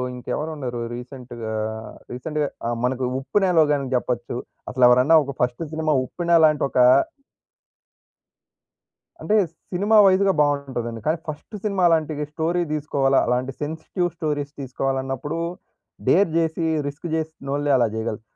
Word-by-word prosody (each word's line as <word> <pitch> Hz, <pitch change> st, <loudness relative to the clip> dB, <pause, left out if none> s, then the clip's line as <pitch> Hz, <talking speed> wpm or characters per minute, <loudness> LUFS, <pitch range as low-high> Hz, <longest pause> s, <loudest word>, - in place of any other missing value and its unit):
ఇంకెవరున్నరు 130 Hz, -1 st, -4 dB
రీసెంట్‌గా? 120 Hz, -3 st, -7 dB, 0.6 s
రీసెంట్‌గా 150 Hz, +4 st, -2 dB, 0.2 s
ఆహ్, 120 Hz, 0 st, -1 dB
మనకు 130 Hz, 0 st, -1 dB, 0.2 s
'ఉప్పెన'లో 180 Hz, +3 st, +3 dB
గానీ 140 Hz, -2 st, -1 dB
జెప్పచ్చు. 120 Hz, -1 st, -2 dB, 0.3 s
అసలెవరన్నా 125 Hz, +5 st, +5 dB
ఒక 140 Hz, -1 st, -6 dB
ఫస్ట్ 125 Hz, +5 st, 0 dB
సినిమా 155 Hz, -1 st, 0 dB
'ఉప్పెన' 170 Hz, +4 st, +1 dB
లాంటొకా 140 Hz, -4 st, +3 dB, 2.4 s
అంటే, 215 Hz, -, +1 dB, 0.4 s
సినిమా 205 Hz, +4 st, +3 dB
వైజ్‌గా 195 Hz, 0 st, +4 dB
బావుంటదండి. 130 Hz, -6 st, -1 dB
కానీ, 160 Hz, -, +2 dB
ఫస్ట్ 155 Hz, +7 st, -7 dB
సినిమా 200 Hz, -4 st, 0 dB
అలాంటి 160 Hz, -2 st, +2 dB, 0.2 s
స్టోరీ 170 Hz, +3 st, 0 dB
తీసుకోవాలా! 140 Hz, -3 st, +2 dB
అలాంటి 125 Hz, +2 st, 0 dB
సెన్సిటివ్ 160 Hz, +4 st, -2 dB
స్టోరీస్ 145 Hz, -3 st, -2 dB
తీసుకోవాలన్నప్పుడు, 135 Hz, +3 st, -3 dB, 0.7 s
డేర్ 195 Hz, 0 st, +4 dB
జేసి 165 Hz, 0 st, 0 dB, 0.2 s
రిస్క్ 145 Hz, +4 st, -6 dB
చేసినోళ్ళే 145 Hz, -3 st, -2 dB
అలా 120 Hz, -2 st, +3 dB
చేయగలరు. 110 Hz, -1 st, -3 dB
145 Hz, 110 wpm, -23 LUFS, 125-160 Hz, 2.4 s, అసలెవరన్నా